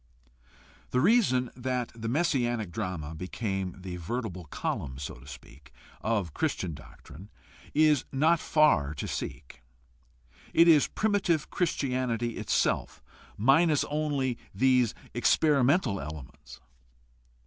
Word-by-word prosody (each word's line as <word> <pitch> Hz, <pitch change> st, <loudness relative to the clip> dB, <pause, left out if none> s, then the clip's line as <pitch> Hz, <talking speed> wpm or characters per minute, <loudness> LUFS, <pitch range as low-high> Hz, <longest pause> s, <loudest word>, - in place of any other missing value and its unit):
The 125 Hz, -, +1 dB
reason 150 Hz, -, +3 dB
that 125 Hz, -1 st, -2 dB
the 115 Hz, -1 st, -6 dB
messianic 120 Hz, -, 0 dB
drama 80 Hz, -4 st, -4 dB
became 95 Hz, +2 st, -4 dB
the 90 Hz, -1 st, -6 dB
vertebral 90 Hz, -1 st, -4 dB
column, 65 Hz, -2 st, -4 dB
so 70 Hz, -, -6 dB
to 60 Hz, +2 st, -15 dB
speak, 65 Hz, -1 st, -13 dB, 0.3 s
of 105 Hz, -8 st, -1 dB
Christian 90 Hz, -3 st, -2 dB
doctrine 80 Hz, +7 st, -13 dB, 0.5 s
is 150 Hz, -3 st, +4 dB
not 155 Hz, +5 st, +3 dB
far 95 Hz, -, +3 dB
to -, -, -4 dB
seek. 65 Hz, -3 st, -6 dB, 0.9 s
It 170 Hz, -, +7 dB
is 155 Hz, -4 st, +6 dB
primitive 200 Hz, -7 st, 0 dB
Christianity 125 Hz, -8 st, -1 dB
itself, -, -, -1 dB, 0.3 s
minus 145 Hz, +7 st, +4 dB
only 145 Hz, -5 st, -1 dB, 0.2 s
these 125 Hz, -3 st, +3 dB, 0.2 s
experi 140 Hz, +3 st, +3 dB
mental 130 Hz, -, +2 dB
elements. 75 Hz, -2 st, -10 dB
120 Hz, 110 wpm, -28 LUFS, 90-145 Hz, 0.9 s, It